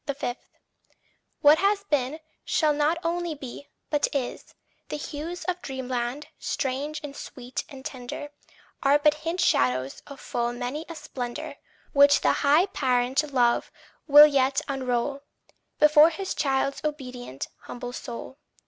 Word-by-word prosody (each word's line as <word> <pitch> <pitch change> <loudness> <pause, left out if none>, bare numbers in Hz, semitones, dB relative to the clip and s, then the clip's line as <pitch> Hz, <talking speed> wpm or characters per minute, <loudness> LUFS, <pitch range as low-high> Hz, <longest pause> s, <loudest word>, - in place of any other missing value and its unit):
5. 275 -3 -3 1.1
What 300 +2 +7
has 400 +1 +2
been, 290 -4 -1 0.2
shall 305 -2 +2
not 300 +3 +1
only 340 -1 -1
be, 275 0 -9 0.2
but 295 -1 +2
is. 255 -3 -4 0.3
The - - -3
hues 310 +4 -6
of 360 -1 -3
dreamland, 260 +1 -3
strange 280 +3 -2
and 285 -1 -7
sweet 250 -2 -6
and 270 -1 -11
tender 260 +1 -6 0.5
Are 280 +1 +5
but 295 0 +4
hint 325 +4 -4
shadows 130 - +1
of 280 -2 -10
full 240 0 -2
many 250 +6 -4
a 335 - -6
splendour 295 0 -6 0.4
Which 285 0 +6
the - - +3
high 300 +6 +5
Parent 265 -3 0
love 240 -3 +2 0.4
will 295 0 +10
yet 270 -2 +2
unroll 270 0 -1 0.6
Before 300 +1 +7
his 380 +3 -4
child's 275 -1 0
obedient, 250 - -5
humble 245 0 -7
soul. 255 +3 -7
280 Hz, 135 wpm, -26 LUFS, 250-300 Hz, 1.1 s, will